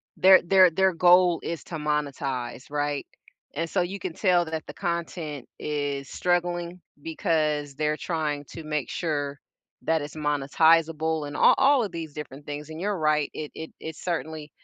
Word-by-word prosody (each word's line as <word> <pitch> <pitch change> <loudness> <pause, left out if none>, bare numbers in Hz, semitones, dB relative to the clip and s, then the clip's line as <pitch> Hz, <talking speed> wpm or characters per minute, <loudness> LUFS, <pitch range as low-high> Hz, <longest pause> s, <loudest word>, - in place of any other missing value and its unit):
their 190 0 +7
their 185 0 +6
their 190 +2 +3
goal 175 0 +5
is 170 -1 -4
to 170 - -7
monetize, 140 -5 -2
right? 145 -1 -1 0.5
And 165 +3 -2
so 185 - +1
you 190 +3 -3
can 185 -3 -4
tell 180 -1 +3
that 160 -1 -4
the - - -7
content 170 -6 -4
is 145 -2 -2
struggling 175 0 -1 0.2
because 155 -4 0
they're 150 +1 0
trying 150 -4 -2
to 165 - -8
make 150 -2 -2
sure 145 -4 -2 0.4
that 160 -1 +1
it's 145 +1 -7
monetizable 155 +1 +2
and 145 - -7
a - - -3
all 270 -1 +5
of 205 - -4
these 165 -3 -6
different 145 -1 -8
things, 145 +1 -6
and 160 0 -7
you're 200 +2 -1
right, 155 -2 +2
i 150 -1 -5
it 160 - -8
is 160 -1 -6
certainly 160 -3 -4
160 Hz, 170 wpm, -26 LUFS, 150-175 Hz, 0.5 s, their